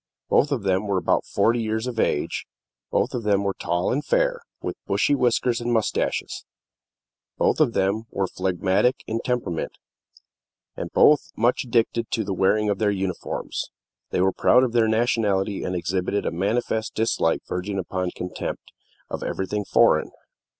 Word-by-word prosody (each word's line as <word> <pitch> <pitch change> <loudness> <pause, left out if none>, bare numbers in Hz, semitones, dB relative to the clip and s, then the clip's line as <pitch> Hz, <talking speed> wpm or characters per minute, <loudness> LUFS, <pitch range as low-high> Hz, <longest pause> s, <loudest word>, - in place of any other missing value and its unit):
Both 145 - +3
of 130 -7 -1
them 95 +1 +1
were 100 -2 +1
about 90 - +1
forty 115 +1 +2
years 110 +1 -1
of 120 -3 -4
age; 75 - 0 0.4
both - - 0
of 125 - -2
them 100 -2 +2
were 100 -1 0
tall 90 +3 -1
and 145 +3 -1
fair, - - +1 0.2
with - - -4
bushy 145 - +2
whiskers 125 -2 +1
and 120 0 -1
mustaches; 110 -3 -1 0.9
both - - +2
of - - +3
them 100 +4 0
were 100 - -1
phlegmatic 95 +7 0
in 115 +1 -2
temperament, 120 -10 -2 1.0
and - - -5
both 150 -1 +5
much 120 +3 +2
addicted 115 -1 +1
to 110 - -1
the 100 -1 -3
wearing 105 +3 +2
of 100 -2 0
their 105 -2 +2
uniforms. 95 -2 -3 0.4
They - - 0
were 95 0 +3
proud 125 - +4
of 125 - 0
their 115 -1 +3
nationality, 110 -3 +1
and 90 - -2
exhibited 90 +3 -1
a - - 0
manifest 110 +5 -1
dislike, 110 -7 +1
verging 95 +2 -3
upon 90 0 -2
contempt, 90 0 -6 0.4
of - - -5
everything 100 +2 -2
foreign. - - +4
105 Hz, 160 wpm, -24 LUFS, 95-120 Hz, 1.0 s, both